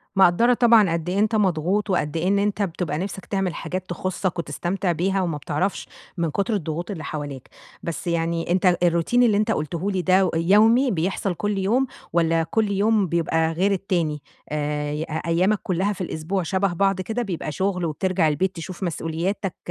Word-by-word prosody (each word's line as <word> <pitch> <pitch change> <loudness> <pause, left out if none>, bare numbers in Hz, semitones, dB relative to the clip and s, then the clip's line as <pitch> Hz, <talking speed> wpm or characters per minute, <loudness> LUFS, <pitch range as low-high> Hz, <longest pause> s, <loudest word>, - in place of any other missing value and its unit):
مقدرة 195 +6 +5
طبعًا 225 -7 +5
قدّ 170 +1 -2
إيه 190 - 0
أنت 215 +1 +2
مضغوط، 195 +1 +1
وقدّ 165 -4 0
إيه 165 +3 0
إن 200 +1 +3
أنت 205 +1 0
بتبقى 175 -4 -2
نِفسك 195 +2 -5
تعمل 195 -3 -1
حاجات 185 +3 -5
تخصّك 185 0 -2
وتستمتع 175 +4 -2
بها 190 +3 0
وما 165 -5 -1
بتعرفش 155 +7 -2 0.3
من 170 -1 0
كتر 205 +6 -1
الضغوط 170 -1 -3
اللي 160 -6 -6
حواليك، 145 -4 -6 0.3
بس 170 +2 -5
يعني 170 0 -1
أنت 185 +1 +3 0.2
الroutine 170 +3 +1
اللي 215 -4 +4
أنت 215 +1 +1
قُلته 170 +2 -2
لي 190 -2 0
ده 185 +1 +3
يومي، 220 +10 +4
بيحصل 185 +2 -1
كُلّ 205 +2 -2
يوم، 230 +8 +1 0.3
والّا 165 -1 +2
كُلّ 210 +5 0
يوم 205 0 +2
بيبقى 165 -1 +1
غير 185 +5 +1
التاني؟ 170 -6 -1 0.3
آآ، 150 0 -2
ي 150 +2 -3 0.2
أيامك 185 +5 +2
كلّها 190 +3 0
في 190 - -8
الأسبوع 175 +2 -2
شبه 190 +2 0
بعض 195 +1 +1
كده 225 +5 -3
بيبقى 180 -8 -4
شغل 185 +2 -1
وبترجع 180 +2 +1
البيت 180 +5 0
تشوف 180 +3 -7
مسؤولياتك 175 +3 -2
185 Hz, 175 wpm, -23 LUFS, 165-200 Hz, 0.3 s, مقدرة